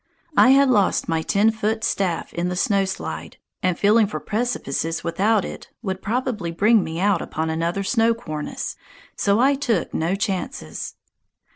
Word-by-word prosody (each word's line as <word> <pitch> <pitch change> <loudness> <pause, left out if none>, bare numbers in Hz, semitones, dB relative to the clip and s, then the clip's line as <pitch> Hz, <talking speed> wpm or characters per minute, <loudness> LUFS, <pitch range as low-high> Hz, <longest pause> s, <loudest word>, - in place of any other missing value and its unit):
I - - +7
had 275 +1 +6
lost 210 -7 +2
my 165 -1 0
ten 205 +6 +3
foot 220 0 -2
staff 185 -6 -1
in 175 +1 -1
the 180 - -2
snow 195 +1 +2
slide, 80 - -5 0.2
and 180 -1 +1
feeling 210 +1 +4
for 210 - -4
precipices 185 - -2
without 200 +5 +1
it - - -8
would 190 -2 -3
probably 230 -5 -2
bring 205 +5 +3
me 160 +1 -5
out 195 -2 +2
upon 160 0 -3
another 170 +4 -1
snow 230 +2 +2
cornice, 155 -9 -5 0.4
so 200 +1 +2
I 270 +3 +5
took 270 -4 -1
no 165 +4 0
chances. 190 - -4
195 Hz, 160 wpm, -22 LUFS, 170-225 Hz, 0.4 s, I